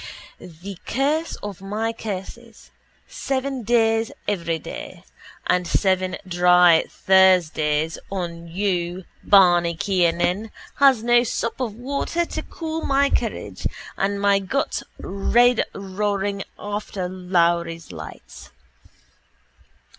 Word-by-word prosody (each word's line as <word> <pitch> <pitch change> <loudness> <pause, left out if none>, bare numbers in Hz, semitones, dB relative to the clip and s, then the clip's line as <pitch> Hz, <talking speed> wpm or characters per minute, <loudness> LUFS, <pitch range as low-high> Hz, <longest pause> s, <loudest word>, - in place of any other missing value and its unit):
The 180 +2 -10
curse 295 +6 0
of 200 -3 -6
my 215 +3 -2
curses 225 +2 -8 0.4
Seven 270 -1 -3
days 225 0 +2 0.2
every 170 -5 -1
day - - -9 0.4
And 180 -1 +1
seven 185 0 +1
dry 180 -2 +5
Thursdays 165 -5 +3
On 170 -3 -5
you, 180 0 -2 0.2
Barney 175 -4 +5
Kiernan, 180 +3 +1 0.3
Has 270 -5 +5
no 240 0 +4
sup 230 0 -3
of 235 -5 -3
water 280 +7 -2
To - - -5
cool 320 -1 -5
my 280 +1 +2
courage, - - -2 0.3
And 200 +1 -1
my 200 0 +3
guts 200 +9 -2 0.2
red 240 +5 +2
roaring 200 0 -2
After 205 -2 -4
Lowry's 170 -2 0
lights. - - -10
195 Hz, 100 wpm, -22 LUFS, 180-230 Hz, 0.4 s, dry